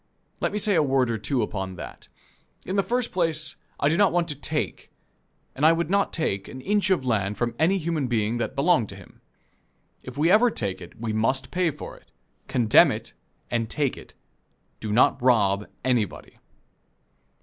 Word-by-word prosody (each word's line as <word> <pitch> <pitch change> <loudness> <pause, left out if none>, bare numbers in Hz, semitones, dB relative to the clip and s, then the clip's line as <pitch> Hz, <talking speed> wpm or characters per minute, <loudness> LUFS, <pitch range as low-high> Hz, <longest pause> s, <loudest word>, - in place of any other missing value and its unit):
Let - - 0
me 210 - -2
say 210 0 +1
a 165 - +4
word 135 -4 +2
or 110 - -2
two 125 +1 0
upon 95 -3 -4
that. - - -10 0.6
In 185 - -3
the 200 - +4
first 245 +3 -1
place 160 -3 0 0.2
I - - +2
do 155 - +2
not 200 -2 +4
want 175 -1 +1
to 150 - -3
take, 150 +2 -3 0.6
and 140 - -5
I 160 +1 +7
would 170 +1 -2
not 200 0 +2
take, 100 -12 -1
an 130 - -9
inch 205 +6 +1
of 180 -9 +1
land 105 -4 0
from 120 -1 -1
any 180 +5 +3
human 160 -5 -1
being 115 0 0
that - - -3
belonged 140 - +2
to 100 - -8
him. 95 -2 -16 0.8
If 130 +1 -10
we 160 +4 +3
ever 235 +4 +6
take 100 - -3
it, 85 - -12
we 110 -1 -3
must 130 +4 0
pay 180 -2 +1
for 150 0 -8
it - - -23 0.4
condemn 115 -4 +5
it - - -6 0.4
and 115 -2 -1
take 140 +1 0
it - - -14 0.6
do 110 - -4
not 120 +3 +3
rob 105 -5 +3 0.2
anybody. 120 -7 -1
135 Hz, 190 wpm, -25 LUFS, 110-170 Hz, 0.8 s, I